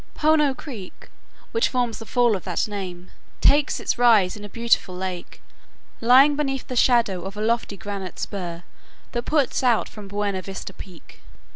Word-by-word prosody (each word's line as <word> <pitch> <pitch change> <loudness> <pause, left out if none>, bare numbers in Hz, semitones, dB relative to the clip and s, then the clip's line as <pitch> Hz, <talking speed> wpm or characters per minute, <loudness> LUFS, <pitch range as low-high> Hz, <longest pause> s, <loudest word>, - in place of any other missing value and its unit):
Pohono 300 -3 +3
Creek, 235 -10 -10 0.4
which 455 0 +2
forms 245 -3 -1
the 225 - -10
fall 240 -3 +3
of 185 - -5
that 180 +1 -1
name, 185 -4 -7 0.3
takes 290 0 +3
its - - -2
rise 220 -7 +5
in 210 - -10
a 205 - -8
beautiful 230 -4 +1
lake, 180 -1 -6 0.6
lying 265 +5 +6
beneath 270 -3 -2
the 255 - -5
shadow 235 -7 +3
of 195 +3 -7
a - - -4
lofty 225 -2 0
granite 200 -3 -6
spur 175 -3 -5 0.5
that 240 0 -3
puts 295 -4 +1
out 245 -4 +2
from 210 -2 -10
Buena 200 -1 -2
Vista 195 +1 -7
peak. 180 -4 -13
215 Hz, 165 wpm, -23 LUFS, 190-250 Hz, 0.6 s, lying